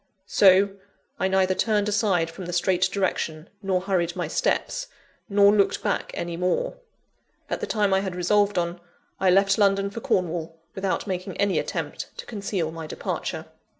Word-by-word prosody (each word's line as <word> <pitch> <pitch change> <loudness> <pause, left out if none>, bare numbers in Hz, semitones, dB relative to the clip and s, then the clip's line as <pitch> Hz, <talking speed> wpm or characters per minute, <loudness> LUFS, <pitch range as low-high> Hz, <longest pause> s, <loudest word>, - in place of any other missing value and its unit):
So, 195 0 +5 0.5
I 190 - +2
neither 190 0 +2
turned 210 +1 +1
aside 200 -6 +1
from 180 +1 -8
the 175 - -4
straight 185 +1 +2
direction, 175 -4 -2
nor 190 -2 0
hurried 180 -3 0
my - - -2
steps, - - -1 0.4
nor 200 0 +6
looked 200 -2 +2
back - - -1
any 170 0 -3
more. 180 - -1 0.7
At - - -1
the - - -2
time 205 -3 +1
I 190 - +4
had 190 -2 -3
resolved 205 +3 +2
on, 175 0 -1 0.4
I 190 - +3
left 195 +2 +4
London 200 -1 +3
for 230 - -5
Cornwall, 165 -4 -1 0.2
without 190 -1 -2
making 185 -1 -4
any 200 -1 +2
attempt - - -4
to - - -7
conceal 200 -7 -3
my 160 -1 -7
departure. - - -4
190 Hz, 165 wpm, -25 LUFS, 175-200 Hz, 0.7 s, nor